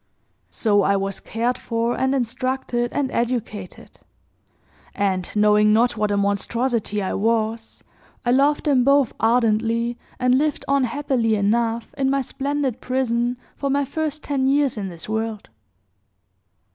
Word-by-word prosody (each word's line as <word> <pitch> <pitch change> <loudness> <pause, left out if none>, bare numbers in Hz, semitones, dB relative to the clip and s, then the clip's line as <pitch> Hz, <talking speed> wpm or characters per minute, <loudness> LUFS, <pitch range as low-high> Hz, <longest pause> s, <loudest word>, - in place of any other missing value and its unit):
So 205 -3 +2
I 200 0 +2
was 195 0 -2
cared 240 +3 -2
for, 230 +1 -1
and 265 +1 +1
instructed, 250 -1 -1
and 275 -2 -1
educated; 225 -6 -4 1.0
and, 190 -3 -1
knowing 210 0 +4
not 235 +3 +3
what 210 -1 0
a 205 - +1
monstrosity 210 +2 0
I 190 - -2
was, 225 +1 -1 0.4
I 240 - +2
loved 280 +3 +3
them 275 -4 +3
both 275 -2 +3
ardently, 230 +1 +1 0.2
and 250 +1 +3
lived 295 -2 -1
on 275 -1 +2
happily 245 -3 0
enough, 225 +3 0
in 265 -1 +2
my 275 0 +1
splendid 275 -1 -2
prison, 245 -1 0 0.2
for 280 - -2
my 280 +1 +1
first 305 +1 -3
ten 270 -2 0
years 280 -1 +2
in 205 -3 -4
this 170 -2 -9
world. 220 -1 -3
235 Hz, 140 wpm, -22 LUFS, 215-265 Hz, 1.0 s, knowing